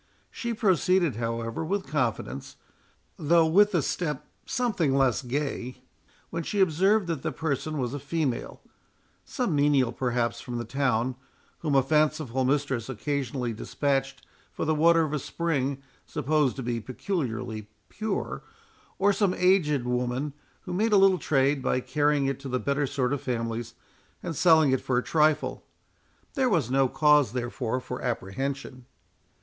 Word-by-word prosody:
She 235 - -4
proceeded, 185 - +2
however, 115 +3 -3
with 195 +4 -2
confidence, 125 - -2 0.6
though 165 +2 +4
with 200 +5 +4
a 160 - +2
step 150 -4 -2 0.2
something 215 - 0
less 135 -3 +2
gay, 130 -1 -4 0.5
when 170 - -2
she 200 +5 -3
observed 190 +4 +3
that 165 -5 -3
the - - -2
person 155 0 -2
was 125 -2 -2
a 145 - -3
female; 150 -3 -3 0.6
some 240 - -1
menial 140 -4 +3
perhaps 120 -2 -1
from 120 -1 -5
the 120 - -4
town, 125 -1 0 0.4
whom 150 -4 -1
a 135 - +5
fanciful 150 -3 +1
mistress 135 -3 0
occasionally 130 -1 -2
dispatched 135 +3 -2 0.3
for - - -3
the 155 - +2
water 165 +2 +4
of 155 -1 -3
a 150 - 0
spring, 140 -3 -2 0.2
supposed 150 -2 +1
to 135 - -5
be 120 -1 -2
peculiarly 120 - -4 0.2
pure, 215 -2 -3 0.6
or 200 +1 +3
some 195 -3 +1
aged 160 -8 +3
woman, 125 +3 -1 0.3
who 180 - -6
made 215 +4 +1
a - - +7
little 190 -2 +5
trade 140 -1 +2
by 125 - +1
carrying 145 +1 +1
it 135 -1 -1
to 135 -1 -7
the 125 0 0
better 140 +1 0
sort 130 0 -1
of 145 - -2
families, 115 -1 -3 0.5
and 165 - -4
selling 160 -3 +5
it 130 - +1
for 125 - 0
a 125 - +1
trifle. 155 -1 +1 0.7
There 265 -3 +2
was 155 - +1
no 135 0 +4
cause, 145 -2 +4
therefore, 125 0 -2
for 125 0 -6
apprehension. 130 +3 -4
140 Hz, 155 wpm, -27 LUFS, 125-160 Hz, 0.7 s, a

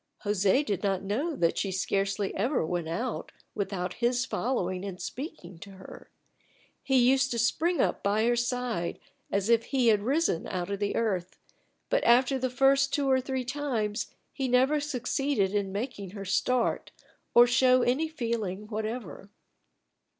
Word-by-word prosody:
José 205 +7 +2
did 200 -7 -2
not 195 -2 0
know 270 - -1
that 170 -8 +1
she 195 - -1
scarcely 195 +1 -1
ever 235 - 0
went 175 0 -2
out 230 +9 -3 0.2
without 190 -3 -3
his 245 +1 +2
following 185 -9 -2
and 190 -2 -6
speaking 190 - -7
to 200 +3 -11
her. 190 0 -12 0.7
He 265 -1 +2
used 260 +2 +4
to 235 - -2
spring 330 +9 +1
up - - +1
by 210 +2 +1
her 240 0 +3
side 240 -7 -2 0.3
as 200 0 0
if 230 -1 +3
he 255 -4 +2
had 210 -2 +3
risen 270 - 0
out 180 +1 -3
of 200 - -2
the 205 -1 -1
earth, 185 -6 -1 0.5
but - - +1
after 255 +3 +4
the 255 0 -1
first 275 +2 +3
two 285 -2 0
or 260 0 +3
three 260 -1 -3
times 240 -6 -2 0.3
he 270 -2 -2
never 260 +4 +3
succeeded 270 -6 -1
in 200 -2 -1
making 205 -2 -4
her 200 - -6
start 235 +6 0 0.5
or 240 - +9
show 255 +1 +4
any 270 +7 +1
feeling 230 - -3
whatever. 215 - -5
235 Hz, 160 wpm, -28 LUFS, 195-260 Hz, 0.7 s, or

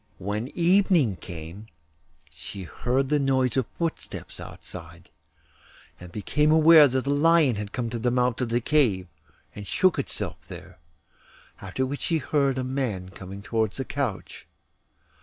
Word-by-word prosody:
When 105 +5 -3
evening 175 - +3
came 85 +5 -9 0.6
she 100 -2 -8
heard 130 +9 -1
the 150 0 +2
noise 130 -3 +1
of 130 -4 +1
footsteps 165 -1 -5
outside, - - -10 0.9
and 90 -1 -11
became 150 - +1
aware 160 -1 +8
that 130 0 -1
the 140 - -1
lion 150 -3 +4
had 105 0 -5
come 120 -3 -3
to 120 - -3
the 120 +2 +1
mouth 125 0 +1
of 125 - -1
the 120 +1 +1
cave, 115 -10 +2 0.5
and 105 -1 -9
shook 185 -5 +2
itself 90 - -4
there, 90 0 -11 0.8
after 100 +7 -2
which 140 +2 -4
she 165 - +1
heard 140 -2 0
a 130 - -1
man 125 -9 -3
coming 95 +1 -10
towards 110 -1 -1
the 135 - -3
couch. 130 -9 -4
125 Hz, 150 wpm, -25 LUFS, 100-145 Hz, 0.9 s, aware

